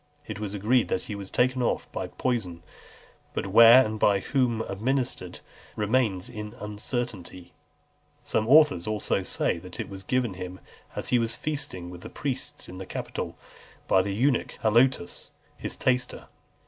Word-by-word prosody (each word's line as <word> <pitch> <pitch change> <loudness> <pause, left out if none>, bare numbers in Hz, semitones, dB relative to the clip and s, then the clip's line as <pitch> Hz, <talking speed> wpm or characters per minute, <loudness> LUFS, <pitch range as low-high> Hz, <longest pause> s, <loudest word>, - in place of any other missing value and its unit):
It 110 -1 -6
is 105 -1 -4
agreed 110 +5 +2
that 90 - -1
he 105 - -6
was 100 -1 -7
taken 130 +1 +2
off 120 - 0
by - - -3
poison; 95 -10 -2 0.7
but - - -1
where, 115 +6 +8
and 110 0 -4
by 100 -1 +4
whom 125 -4 +1
administered, 110 -3 -2 0.3
remains 105 -3 +1
in 105 0 -7
uncertainty. 105 -4 -5 0.7
Some 110 - 0
authors 145 - +5 0.4
say - - 0
that - - -11
it - - -4
was 95 -1 -8
given 120 +2 0
him 90 0 -7 0.4
as - - -3
he 125 - +4
was 115 -1 0
feasting 95 -13 -4
with 90 -1 -10
the - - -8
priests 135 -3 -4
in 90 +1 -9
the 95 - -7
Capitol, - - -5 0.5
by 95 - +5
the 100 +1 -3
eunuch 130 +3 +1
Halotus, 115 -3 +2 0.3
his - - -4
taster. 125 -1 0
110 Hz, 155 wpm, -27 LUFS, 95-125 Hz, 0.7 s, where